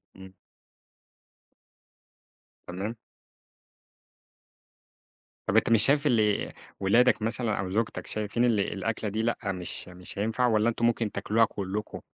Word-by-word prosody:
إمم. 95 Hz, 0 st, -12 dB, 2.3 s
تمام. 100 Hz, +6 st, -4 dB, 2.5 s
طَب 95 Hz, -, 0 dB
أنت 110 Hz, -, +3 dB
مش 115 Hz, -2 st, +5 dB
شايف 145 Hz, +2 st, +3 dB
اللي 110 Hz, -5 st, +2 dB, 0.3 s
ولادك 115 Hz, +6 st, +4 dB
مثلًا 115 Hz, -1 st, -1 dB
أو 95 Hz, -2 st, -2 dB
زوجتك 110 Hz, +4 st, -2 dB
شايفين 110 Hz, +3 st, -1 dB
اللي 115 Hz, -4 st, +3 dB
الأكلة 110 Hz, +2 st, -2 dB
دي 110 Hz, +2 st, -2 dB
لأ 115 Hz, +1 st, 0 dB
مش 90 Hz, -2 st, -6 dB
مش 90 Hz, +1 st, -10 dB
هينفع 115 Hz, +4 st, +1 dB
والّا 110 Hz, -1 st, +3 dB
أنتم 115 Hz, 0 st, 0 dB
ممكن 115 Hz, -2 st, +1 dB
تاكلوها 115 Hz, +2 st, +2 dB
كلكم؟ 100 Hz, 0 st, -5 dB
110 Hz, 120 wpm, -28 LUFS, 100-115 Hz, 2.5 s, مش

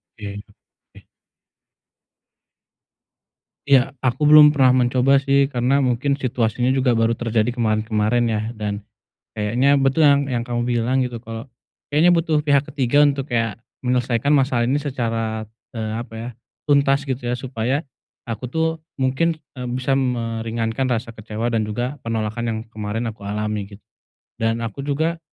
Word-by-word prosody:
Oke, 105 Hz, -1 st, -7 dB, 0.3 s
oke. -, -, -22 dB, 2.6 s
Iya, 135 Hz, 0 st, +4 dB
aku 130 Hz, +4 st, +1 dB
belum 150 Hz, 0 st, +9 dB
pernah 130 Hz, -3 st, +4 dB
mencoba 130 Hz, +2 st, +3 dB
sih, 140 Hz, 0 st, +3 dB
karena 130 Hz, +1 st, +1 dB
mungkin 135 Hz, +2 st, 0 dB
situasinya 120 Hz, -1 st, 0 dB
juga 130 Hz, -2 st, +2 dB
baru 115 Hz, +1 st, +2 dB
terjadi 115 Hz, +1 st, 0 dB
kemarin-kemarin 110 Hz, +1 st, +1 dB
ya, 110 Hz, -2 st, 0 dB, 0.2 s
dan, 105 Hz, -1 st, -3 dB, 0.5 s
kayaknya 125 Hz, +7 st, +2 dB
betul 135 Hz, +3 st, +2 dB
yang 140 Hz, -2 st, +5 dB
yang 125 Hz, -3 st, -1 dB
kamu 120 Hz, 0 st, -2 dB
bilang 125 Hz, +2 st, +1 dB
gitu, 120 Hz, -2 st, -6 dB
kalau, 115 Hz, +1 st, -7 dB, 0.5 s
kayaknya 165 Hz, +4 st, +5 dB
butuh 165 Hz, -3 st, +2 dB
pihak 145 Hz, -1 st, +2 dB
ketiga 145 Hz, 0 st, +2 dB
untuk 140 Hz, -1 st, -1 dB
kayak, 115 Hz, -2 st, -1 dB, 0.2 s
menyelesaikan 125 Hz, +2 st, +1 dB
masalah 130 Hz, -4 st, +2 dB
ini 140 Hz, +4 st, +1 dB
secara, 115 Hz, -5 st, -2 dB, 0.3 s
eee, 110 Hz, -1 st, -3 dB
apa 115 Hz, +1 st, -6 dB
ya, 115 Hz, +2 st, -5 dB, 0.4 s
tuntas 140 Hz, -1 st, +3 dB
gitu 130 Hz, -2 st, -3 dB
ya, 125 Hz, -, -1 dB
supaya, 130 Hz, +3 st, -2 dB, 0.4 s
aku 120 Hz, +1 st, -5 dB
tuh, 160 Hz, +3 st, +1 dB, 0.3 s
mungkin, 135 Hz, +5 st, +1 dB, 0.2 s
e 125 Hz, -, -9 dB
bisa 130 Hz, +2 st, -1 dB
meringankan 115 Hz, -1 st, -1 dB
rasa 115 Hz, -1 st, -2 dB
kecewa 110 Hz, +2 st, -4 dB
dan 110 Hz, -, +2 dB
juga, 120 Hz, +6 st, -3 dB
penolakan 115 Hz, 0 st, -3 dB
yang 110 Hz, -1 st, -2 dB
kemarin 110 Hz, +2 st, -3 dB
aku 110 Hz, -2 st, -6 dB
alami 105 Hz, -1 st, -3 dB
gitu. -, -, -35 dB, 0.6 s
Dan 115 Hz, +1 st, 0 dB
aku 115 Hz, +5 st, -5 dB
juga, 160 Hz, +4 st, 0 dB
125 Hz, 145 wpm, -21 LUFS, 115-140 Hz, 2.6 s, belum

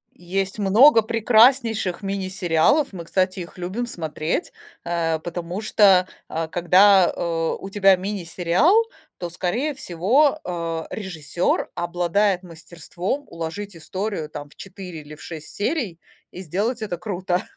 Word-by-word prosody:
Есть 190 Hz, +3 st, -3 dB
много 225 Hz, +5 st, +6 dB
прекраснейших 225 Hz, -3 st, +3 dB
мини-сериалов, 195 Hz, -, +1 dB
мы, 170 Hz, -3 st, -8 dB
кстати, 185 Hz, +1 st, 0 dB
их 170 Hz, +1 st, -9 dB
любим 190 Hz, +7 st, -3 dB
смотреть, 160 Hz, -, -3 dB, 0.3 s
э, 165 Hz, -2 st, -1 dB
потому 175 Hz, +3 st, -5 dB
что, 195 Hz, -4 st, +4 dB, 0.2 s
а, 160 Hz, 0 st, -3 dB
когда, 185 Hz, +2 st, +5 dB
э, 165 Hz, -1 st, -1 dB
у 195 Hz, -, -7 dB
тебя 195 Hz, -1 st, +5 dB
мини-сериал, 185 Hz, -, +1 dB, 0.4 s
то, 175 Hz, -1 st, -4 dB
скорее 235 Hz, -, -2 dB
всего, 260 Hz, -, +2 dB
э, 165 Hz, -2 st, -3 dB
режиссёр 175 Hz, -4 st, -2 dB
обладает 175 Hz, +3 st, 0 dB
мастерством 170 Hz, -, -5 dB
уложить 170 Hz, +4 st, -6 dB
историю 185 Hz, -1 st, -4 dB
там 145 Hz, -1 st, -8 dB
в -, -, -21 dB
4 185 Hz, -4 st, -9 dB
или 150 Hz, +1 st, -11 dB
в -, -, -17 dB
6 160 Hz, -2 st, -9 dB
серий 210 Hz, -, -2 dB, 0.3 s
и 185 Hz, -, -8 dB
сделать 210 Hz, -, -2 dB
это 190 Hz, -5 st, -3 dB
круто. 180 Hz, 0 st, -2 dB
185 Hz, 130 wpm, -22 LUFS, 170-205 Hz, 0.4 s, много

